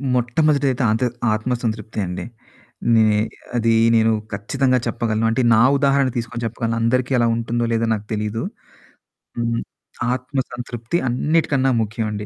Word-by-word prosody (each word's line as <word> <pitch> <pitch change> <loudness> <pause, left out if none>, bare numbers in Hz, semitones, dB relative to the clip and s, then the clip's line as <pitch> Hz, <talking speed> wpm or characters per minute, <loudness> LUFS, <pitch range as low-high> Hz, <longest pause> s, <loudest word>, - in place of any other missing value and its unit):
మొట్టమొదటిది 140 +4 +2
అయితే 130 +1 -2
ఆంతర్ 115 +3 0 0.2
ఆత్మ 110 +4 -2
సంతృప్తి 110 -1 -3
అండి. 90 0 -5 0.7
నే 110 -1 +5 0.5
అది 115 -1 +2 0.2
నేను 115 0 +4 0.2
ఖచ్చితంగా 130 +6 +1
చెప్పగలను. 115 -1 -1
అంటే 115 +3 +1
నా 110 - +5 0.2
ఉదాహరణ 140 -1 +2
తీసుకొని 115 0 -4
చెప్పగలను. 115 0 -2
అందరికీ 125 +3 +1
అలా 120 - +3
ఉంటుందో 115 +1 -1
లేదో 115 0 +1
నాకు 105 -1 -4
తెలీదు. 105 +1 -2 1.0
హ్మ్. 115 0 0 0.5
ఆత్మ 130 +2 -3
సంతృప్తి 120 +4 -3
అన్నిటికన్నా 135 0 +1
ముఖ్యమండి. 105 -1 -3
115 Hz, 130 wpm, -21 LUFS, 110-130 Hz, 1.0 s, నే